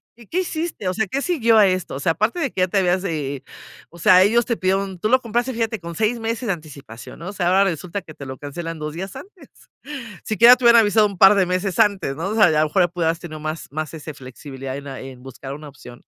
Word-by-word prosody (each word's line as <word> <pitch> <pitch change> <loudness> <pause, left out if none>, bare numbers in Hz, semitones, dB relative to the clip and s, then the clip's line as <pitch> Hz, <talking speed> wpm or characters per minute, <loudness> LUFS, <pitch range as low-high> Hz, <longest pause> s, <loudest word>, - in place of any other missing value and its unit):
Y, 235 -3 -17
¿qué 370 +2 -1
hiciste? 320 - -4
O 185 - 0
sea, 220 0 -1
¿qué 275 +8 -3
siguió 235 -11 +2
a 210 - +7
esto? 185 -6 -1
O - - -5
sea, 165 - +1
aparte 215 - -1
de 275 - -1
que 185 - -2
ya 185 - +3
te 195 - -1
habías, 185 0 +1
eh 145 -6 -3
eh, - - -17 0.5
o 170 - -16
sea 180 +2 +6
ellos 230 +4 +3
te 235 - -1
pidieron 190 -1 -1
tú 215 - -1
lo 255 +1 +5
compraste 240 +2 -2
fíjate 225 -2 -2
con 170 0 -8
6 225 +4 0
meses 230 +2 -3
de 195 - +2
anticipación, 140 -7 -11
¿no? 170 +4 -7
O - - -7
sea 180 -2 -1
ahora 190 +2 +4
resulta 180 +1 -3
que 155 - -12
te 140 -2 -10
lo 130 -1 -7
cancelan 165 +3 -6
2 150 0 -5
días 190 +5 -7
antes. 370 +7 -13 0.8
Si 215 - -3
quiera 240 +5 +8
te 250 - -7
hubieran 235 -1 +8
avisado 210 0 +3
un 200 -2 -6
par 195 +1 +7
de 190 -2 +3
meses 185 +3 -2
antes 200 -10 +1
¿no? 170 +5 -3
O - - -2
sea, 215 -7 +5
y - - 0
a - - +4
lo 155 - +3
mejor 175 +2 +1
pudieras 165 -1 -1
tener 155 -2 -8
más 155 +1 -5
más, 155 +1 -5
ese, 155 -1 -8
flexibilidad 135 0 -8
en, 140 0 -8
ah, 135 - -7 0.2
buscar 135 +1 -8
una 150 0 -10
opción, 125 -3 -14
185 Hz, 270 wpm, -21 LUFS, 155-220 Hz, 0.8 s, quiera